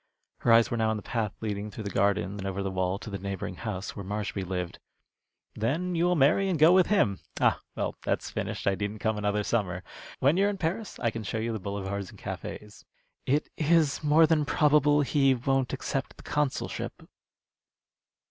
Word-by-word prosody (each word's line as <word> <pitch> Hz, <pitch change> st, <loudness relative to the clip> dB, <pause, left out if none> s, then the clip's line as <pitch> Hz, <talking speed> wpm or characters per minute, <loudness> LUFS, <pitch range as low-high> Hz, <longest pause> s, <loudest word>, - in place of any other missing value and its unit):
Her 120 Hz, -, +2 dB
eyes 115 Hz, 0 st, +6 dB
were 120 Hz, -, 0 dB
now 110 Hz, -1 st, +2 dB
on 110 Hz, -, 0 dB
the 105 Hz, -, -8 dB
path 110 Hz, -4 st, -1 dB
leading 105 Hz, -1 st, -3 dB
through 110 Hz, -, -7 dB
the 100 Hz, -, -4 dB
garden 95 Hz, -1 st, +1 dB
and 95 Hz, -, -4 dB
over 95 Hz, 0 st, -2 dB
the 95 Hz, -, -2 dB
wall 95 Hz, 0 st, 0 dB
to 110 Hz, -, -8 dB
the 100 Hz, -, -4 dB
neighboring 95 Hz, -1 st, -4 dB
house 100 Hz, -4 st, -5 dB
where 100 Hz, -, -6 dB
Marshby 100 Hz, 0 st, -3 dB
lived. 90 Hz, -1 st, -4 dB, 0.7 s
"Then 160 Hz, +12 st, -1 dB
you 170 Hz, 0 st, +2 dB
will 180 Hz, 0 st, +3 dB
marry 165 Hz, +7 st, +4 dB
and 180 Hz, -, +1 dB
go 160 Hz, +4 st, +7 dB
with 185 Hz, -1 st, +5 dB
him. 100 Hz, -, +2 dB, 0.2 s
Ah, -, -, +3 dB
well, -, -, -2 dB
that's -, -, -2 dB
finished. -, -, -4 dB
I 100 Hz, -, +3 dB
needn't 100 Hz, +2 st, -3 dB
come 110 Hz, -2 st, 0 dB
another 105 Hz, 0 st, 0 dB
summer. 90 Hz, -5 st, -1 dB, 0.3 s
When 140 Hz, +6 st, +3 dB
you 200 Hz, +1 st, +4 dB
are -, -, +2 dB
in 205 Hz, -, -3 dB
Paris, 190 Hz, +4 st, -3 dB
I 115 Hz, -, 0 dB
can 115 Hz, -, -5 dB
show 110 Hz, +1 st, -3 dB
you 115 Hz, +1 st, -1 dB
the 110 Hz, -, -3 dB
boulevards 100 Hz, 0 st, -4 dB
and -, -, -14 dB
cafés." 105 Hz, 0 st, -7 dB, 0.4 s
"It 145 Hz, +4 st, +1 dB
is 155 Hz, -2 st, +2 dB
more 155 Hz, +2 st, +6 dB
than 155 Hz, -1 st, +2 dB
probable 150 Hz, 0 st, +4 dB
he 135 Hz, -1 st, +3 dB
won't 135 Hz, +1 st, 0 dB
accept 135 Hz, 0 st, -3 dB
the -, -, -13 dB
consulship." 145 Hz, -2 st, -2 dB
115 Hz, 205 wpm, -28 LUFS, 100-150 Hz, 0.7 s, go